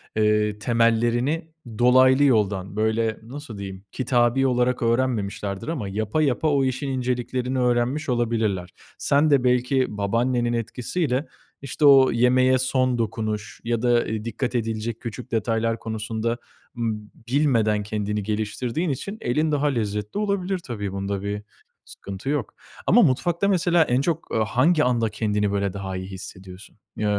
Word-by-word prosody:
eee, 105 -1 +2
temellerini 120 - +1 0.3
dolaylı 130 +3 +5
yoldan, 100 -7 +1
böyle, 110 +1 0
nasıl 125 -2 -8
diyeyim, 95 -1 -7
kitabi 130 0 +2
olarak 125 0 +1
öğrenmemişlerdir 115 -4 -1
ama 135 -12 -3
yapa, 110 +9 -1
yapa 150 +2 +1
o 140 -2 +2
işin 130 +2 -2
inceliklerini 125 0 -2
öğrenmiş 125 +4 +1
olabilirler. 110 -6 0 0.3
Sen 145 +2 +2
de 135 -3 +4
belki 125 +1 +2
babaannenin 120 +4 0
etkisiyle, 125 +5 -2 0.3
işte, 140 +2 -1
o 135 -2 +7
yemeğe 130 +2 +4
son 130 -1 +1
dokunuş 110 -2 -3
ya 115 -1 -1
da, 125 - 0
ııı, 110 -3 +1
dikkat 120 +2 -3
edilecek 115 0 -2
küçük 115 -2 -7
detaylar 115 0 0
konusunda, 110 +1 -3 0.4
ımm, 110 -2 -2
b - - -22 0.2
bilmeden 115 -8 +2
kendini 105 0 -2
geliştirdiğin 110 - -2
için 195 - -4
elin 150 +6 0
daha 145 0 +1
lezzetli 105 - -2
olabilir 195 -3 -1
tabii, 105 - -5
bunda 100 0 -3
bir 100 +1 -3 0.4
sıkıntı 100 +7 -7
yok. 145 -7 -2 0.3
Ama 240 - +6
mutfakta, 170 - +2
mesela, 175 -3 +3
en 125 -2 +1
çok, 165 +2 -2
ııı, 110 - +2
hangi 150 +9 +3
anda 120 -3 +1
kendini, 105 -1 -1
böyle, 100 -1 -1
daha 95 -1 -5
iyi 95 - -6
hissediyorsun? 95 +1 -10 0.2
Eee, 110 - -3
120 Hz, 145 wpm, -24 LUFS, 105-130 Hz, 0.4 s, o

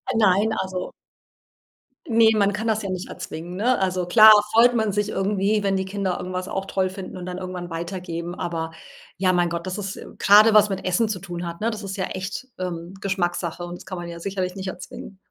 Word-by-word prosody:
Nein, 215 0 +3
also 190 -1 -4 1.2
ne, 225 -2 +5
man 200 -1 +3
kann 220 +3 -3
das 220 0 +1
ja 195 - -4
nicht 185 0 -4
erzwingen, 170 +3 -7
ne? 240 +6 +2
Also 185 -1 0
klar, 215 +4 +9 0.2
freut 240 +2 +6
man 220 -3 +1
sich 205 +1 0
irgendwie, 200 +1 0
wenn 195 -1 +1
die 190 - -2
Kinder 190 -2 -2
irgendwas 185 0 -4
auch 195 0 -3
toll 190 -1 0
finden 190 0 -8
und 180 -1 -7
dann 180 0 -5
irgendwann 180 -1 -6
weitergeben, 170 0 -5
aber 165 -1 -3 0.4
ja, 185 0 +2
mein 175 -1 +2
Gott, 170 0 -4
das 185 - -3
ist 195 -1 -4
äh, - - -10
grade 210 +2 +7
was 210 -1 +7
mit 195 -1 -3
Essen 185 +5 +1
zu 210 -3 -3
tun 175 -1 -6
hat, 170 +2 -7
ne, 225 - +1
das 215 -1 -6
ist 195 -1 -5
ja 190 - -1
echt, 190 +7 -5
ähm, 175 -1 -5
Geschmackssache 175 -3 -2
und 175 0 -6
das 175 - -12
kann 190 -1 -6
man 175 0 -6
ja 170 - -8
sicherlich 185 0 -3
nicht 190 -1 -5
erzwingen. 190 +1 -8
190 Hz, 220 wpm, -23 LUFS, 180-205 Hz, 1.2 s, klar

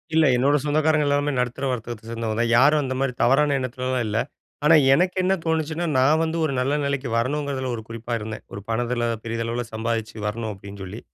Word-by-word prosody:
இல்ல. 160 -1 +5
என்னோட 140 +4 +3
சொந்தக்காரங்க 155 0 +2
எல்லாருமே 145 +1 +1
நடுத்தர 125 +2 -2
வர்க்கத்த 115 -2 -6
சேர்ந்தவங்க 115 -2 -3
தான். 120 0 +1
யாரும் 145 +4 +5
அந்தமாரி 130 0 -1
தவறான 145 +3 +4
எண்ணத்துலலாம் 130 0 -2
இல்ல. 105 0 -1 0.5
ஆனா, 165 +2 +7 0.2
எனக்கு 180 +5 +2
என்ன 185 +1 +3
தோணுச்சுன்னா, 160 +1 -1
நான் 145 +5 +4
வந்து 165 0 -1
ஒரு 145 - -1
நல்ல 130 +3 0
நிலைக்கு 140 -2 -2
வரணுங்கிறதுல 135 +1 -1
ஒரு 110 - -7
குறிப்பா 115 +1 -5
இருந்தேன். 110 0 -6
ஒரு 100 - -6
பணத்துல 120 +1 -1 0.2
பெரிதளவுல 115 +1 -2
சம்பாதிச்சு 110 0 -2
வரணும் 110 +1 -3
அப்பிடின்னு 100 0 -10
சொல்லி. 95 +4 -7
130 Hz, 180 wpm, -23 LUFS, 115-145 Hz, 0.5 s, ஆனா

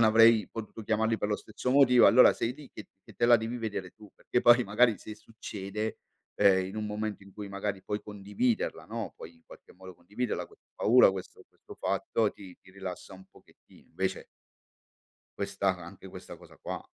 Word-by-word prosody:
non - - +6
avrei 115 -1 +5
potuto 110 0 -8
chiamarli 110 +1 +1
per 105 - -2
lo 105 - 0
stesso 125 - -5
motivo 125 -3 +6
allora 125 +2 +7
sei 120 +2 -2
lì 145 -1 -14
che - - -10 0.2
che - - -16
te 120 - +1
la 120 0 +7
devi 115 +2 -4
vedere 105 -5 -4
tu, 105 0 -17
perché 125 - -1
poi 120 +1 +6
magari 110 +2 +3
se 110 - -9
succede, 105 -1 -6 0.4
ehm, 95 -2 +4
in 95 - -8
un 110 0 -3
momento 105 0 -4
in 100 0 -16
cui 105 0 -8
magari 100 -1 -4
puoi 105 0 -3
condividerla, 105 +3 -2
no, 110 -7 -5
puoi 85 +1 -11
in 80 - -26
qualche - - -16
modo 95 0 -13
condividerla, 105 +8 -4
questa - - -24
paura, 120 -2 +5
questo 95 -1 -8
questo - - -15
fatto, 110 -2 0
ti 95 -3 -13
ti 95 - -19
rilassa 95 -1 -8
un 95 0 -14
pochettino. - - -22
Invece - - -3 1.1
questa - - -1
anche - - -11
questa - - -10
cosa - - -17
qua. - - -6
105 Hz, 190 wpm, -29 LUFS, 100-115 Hz, 1.1 s, allora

